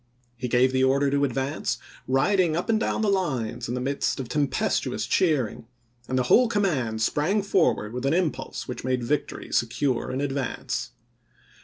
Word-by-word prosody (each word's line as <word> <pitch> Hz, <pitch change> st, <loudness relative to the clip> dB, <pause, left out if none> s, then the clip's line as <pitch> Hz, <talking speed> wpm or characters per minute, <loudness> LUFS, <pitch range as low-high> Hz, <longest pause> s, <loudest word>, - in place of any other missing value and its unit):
He 125 Hz, +1 st, -4 dB
gave 125 Hz, +2 st, +3 dB
the 130 Hz, 0 st, +2 dB
order 135 Hz, +1 st, +3 dB
to 140 Hz, 0 st, +2 dB
advance, 135 Hz, +3 st, -2 dB, 0.3 s
riding 165 Hz, +5 st, +2 dB
up 175 Hz, -, -3 dB
and 220 Hz, -1 st, +3 dB
down 220 Hz, -, -1 dB
the -, -, +2 dB
lines 125 Hz, -, -1 dB
in 120 Hz, -, -1 dB
the -, -, -2 dB
midst 135 Hz, +2 st, -1 dB
of 130 Hz, -, -4 dB
tempestuous 145 Hz, +2 st, 0 dB
cheering, 135 Hz, -, +1 dB, 0.4 s
and 130 Hz, -, -1 dB
the 130 Hz, -, +2 dB
whole 245 Hz, -, +5 dB
command 140 Hz, -, 0 dB
sprang 180 Hz, -, +1 dB
forward 165 Hz, -, +1 dB
with 125 Hz, +2 st, -2 dB
an 140 Hz, -, +2 dB
impulse 175 Hz, -4 st, -2 dB
which 125 Hz, -, -6 dB
made 130 Hz, -1 st, 0 dB
victory 145 Hz, +5 st, -2 dB
secure 120 Hz, +2 st, 0 dB
in 130 Hz, -, -2 dB
advance. 140 Hz, -2 st, -2 dB
135 Hz, 170 wpm, -25 LUFS, 125-160 Hz, 0.4 s, whole